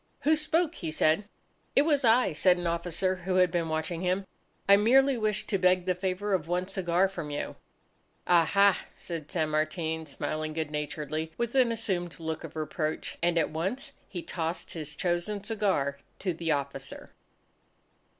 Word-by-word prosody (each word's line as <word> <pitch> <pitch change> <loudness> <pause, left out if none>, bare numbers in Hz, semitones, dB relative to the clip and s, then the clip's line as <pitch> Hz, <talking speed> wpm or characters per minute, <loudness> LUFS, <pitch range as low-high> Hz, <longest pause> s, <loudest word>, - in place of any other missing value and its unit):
"Who 310 +2 +4
spoke?" 320 +2 +1
he 165 - -5
said. 155 +5 +2 0.5
"It 280 - +6
was 295 -3 +2
I," 230 -5 +4
said 180 +3 +4
an 175 - -4
officer 175 +2 -1
who 185 +1 -2
had 180 -2 +4
been 170 -2 0
watching 160 +2 -2
him. 185 +2 0 0.4
"I 200 - +9
merely 265 +6 +5
wished 215 -3 0
to 195 - +1
beg 180 0 +3
the 185 - +2
favour 190 +2 -2
of 170 -4 0
one 180 +1 0
cigar 185 -1 +2
from 170 -6 -6
you." 145 - -4 0.7
"Ah 170 -2 +5
ha!" 200 +2 +3
said 165 -4 -6
San 160 -4 0
Martin 160 +1 -1
smiling 155 +2 -3
good 155 -1 -3
naturedly 155 +1 -3
with 235 -1 -1
an 255 -3 +4
assumed 180 -8 -2
look 160 0 -4
of 165 -1 -9
reproach. 155 0 -3
And 170 0 +2
at 160 - +2
once 190 - -2 0.2
he 175 -3 -5
tossed 165 0 -3
his 150 -2 -6
chosen 180 +3 -1
cigar 195 -11 0 0.2
to 185 -3 -1
the 165 0 -4
officer. 140 -2 -4
175 Hz, 170 wpm, -29 LUFS, 160-200 Hz, 0.7 s, I